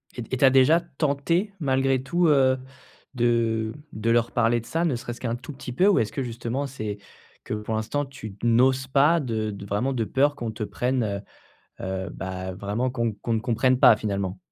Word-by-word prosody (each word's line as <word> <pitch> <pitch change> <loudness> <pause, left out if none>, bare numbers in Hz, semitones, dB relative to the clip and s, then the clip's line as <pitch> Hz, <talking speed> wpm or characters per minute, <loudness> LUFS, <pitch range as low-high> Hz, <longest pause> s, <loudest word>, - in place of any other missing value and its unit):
Et 120 - -4
t 120 - -12
et - - +1
tu 135 - +4
as - - +8
déjà 135 +5 +5
tenté, 165 +4 -1
malgré 135 -2 +1
tout, 170 +6 +1
heu, 130 -3 +4 0.6
de 115 -3 +1 0.2
de 110 +2 -2
leur 115 0 +2
parler 120 +1 +2
de 115 - -11
ça, 165 +6 -1
ne 140 -7 +1
serait-ce 120 0 -6
qu'un 120 -2 -1
tout 125 +5 -9
petit 125 -2 -8
peu, 185 +9 +3
ou 205 - +5
est-ce 110 - 0
que 135 - -3
justement 120 +3 -3
c'est 110 -6 -5 0.5
que, - - -5
pour 105 +1 -3
l'instant, 115 +7 -1
tu 135 -6 -9
d 95 - -16
n'oses 130 +3 +3
pas 145 +5 +4
de 110 -6 -2
de 100 0 -8
vraiment 105 +7 -1
de 120 -3 0
peur 145 +5 +2
qu'on 120 -4 -4
te 110 - -5
prenne, 125 +3 -1
heu 100 -2 -2 0.6
heu, 95 0 -3
bah, 95 0 -5
vraiment 105 +7 -2
qu'on 115 -3 -1
qu'on 110 +3 -4
ne 110 - 0
comprenne 125 +2 +2
pas, 110 - +7
finalement? 100 -3 -3
120 Hz, 215 wpm, -25 LUFS, 110-135 Hz, 0.6 s, as